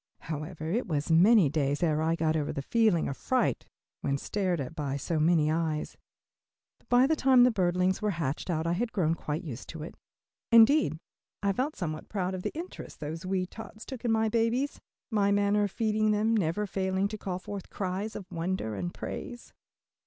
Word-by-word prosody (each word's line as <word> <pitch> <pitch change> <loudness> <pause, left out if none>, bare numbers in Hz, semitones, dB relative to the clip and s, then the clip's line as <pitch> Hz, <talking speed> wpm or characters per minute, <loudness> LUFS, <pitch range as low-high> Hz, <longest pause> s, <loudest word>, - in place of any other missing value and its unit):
However, 155 +1 -5
it 235 +6 0
was 150 -2 -1
many 190 +2 +6
days 145 +1 0
ere 155 -2 +2
I 165 +1 +2
got 160 -1 +1
over 150 -2 -1
the 140 - -4
feeling 215 -3 +2
of 140 - -3
fright 255 - 0 0.3
when 140 0 -1
stared 185 +2 -1
at 140 +3 -4
by 140 -3 -3
so 155 +3 -2
many 155 -1 +3
eyes, 160 -1 -1 0.8
but - - -32
by 245 +1 +6
the 315 +3 +2
time 260 -3 +5
the 250 - +5
birdlings 185 -1 +1
were 210 - +1
hatched 150 +1 -2
out 160 -2 0
I 170 - +1
had 225 +6 -1
grown 165 -5 +1
quite 155 0 -4
used 135 -7 -7
to 160 -2 -6
it. 160 - -7 0.6
Indeed 230 - +6 0.5
I 200 0 +2
felt 270 +9 -1
somewhat 155 -4 -5
proud 190 -2 -2
of 185 - -4
the - - -2
interest 350 +3 -8
those 160 +4 -5
wee 185 -1 0
tots 220 +3 -10
took 260 -3 -8
in 235 - +1
my 220 0 +2
babies, 230 +5 0 0.3
my 205 -2 +2
manner 205 +1 +3
of 200 - -4
feeding 215 -1 +1
them 215 +2 +2
never 200 +1 0
failing 190 0 0
to 215 - -5
call 185 -3 -3
forth 195 +1 -7
cries 195 +3 -3
of 195 - -6
wonder 170 -9 -2
and 175 +12 -3
praise. 240 -1 -7
185 Hz, 195 wpm, -29 LUFS, 160-215 Hz, 0.8 s, many